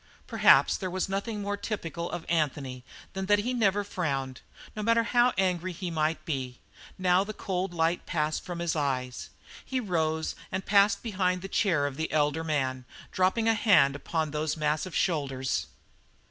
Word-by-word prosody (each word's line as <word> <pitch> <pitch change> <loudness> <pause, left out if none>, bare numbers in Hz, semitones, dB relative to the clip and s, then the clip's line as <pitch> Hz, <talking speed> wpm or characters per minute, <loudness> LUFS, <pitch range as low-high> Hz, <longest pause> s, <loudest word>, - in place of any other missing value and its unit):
Perhaps - - +5
there 185 - -4
was 185 +1 -2
nothing 200 +2 -3
more 205 0 -1
typical 170 -5 -4
of 175 -1 -5
Anthony 145 -6 -1 0.3
than 190 0 -4
that 205 +1 +5
he 235 +5 -1
never 205 -4 +2
frowned, 135 -9 -3 0.3
no 215 - -3
matter 230 +2 +3
how 240 +1 +3
angered 185 -1 0
he 180 0 -5
might 155 0 -1
be. 130 -5 -4 0.4
Now 185 0 +3
the 215 +1 -7
cold 185 -1 -2
light 165 0 0
passed 155 -2 -1
from 175 -1 -6
his 170 -1 -1
eyes. 130 -4 -2 0.3
He 260 - -2
rose 160 -7 -1 0.2
and 185 +1 -3
passed 200 0 +4
behind 185 -4 0
the - - -4
chair 175 -7 +1
of 140 -1 -4
the 160 0 -2
elder 150 +1 +1
man, 135 -5 -1 0.3
dropping 190 +5 +1
a 225 - +5
hand 185 -11 +4
upon 155 +1 -2
those 155 +1 -2
massive 155 +3 -1
shoulders. 135 -6 0
175 Hz, 170 wpm, -28 LUFS, 150-195 Hz, 0.4 s, Perhaps